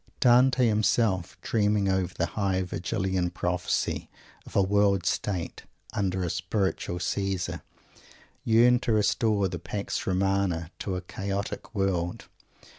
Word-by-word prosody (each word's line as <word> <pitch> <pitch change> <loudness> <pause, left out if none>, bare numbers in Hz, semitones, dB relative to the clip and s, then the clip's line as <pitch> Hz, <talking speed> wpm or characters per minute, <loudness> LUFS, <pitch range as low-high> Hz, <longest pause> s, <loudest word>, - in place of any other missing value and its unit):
Dante 125 +1 +5
himself, 105 -4 +1
dreaming 105 -2 +1
over 95 -2 +1
the 85 - -1
high 95 -3 0
Virgilian 90 +1 -1
Prophecy 90 0 -1 0.4
of - - -12
a 100 - +5
World 100 -2 +2
State, 90 -3 -2 0.3
under 95 -2 -1
a 90 - -1
Spiritual 95 -1 -1
Caesar, 95 +1 -2 0.8
yearned 120 +2 +5
to 115 - 0
restore 105 -1 +2
the 90 -2 -5
Pax 100 +5 -4
Romana 95 -3 0
to 95 - -3
a 90 - -3
chaotic 100 +4 -5
world. 90 -3 -1
95 Hz, 120 wpm, -27 LUFS, 90-105 Hz, 0.8 s, Dante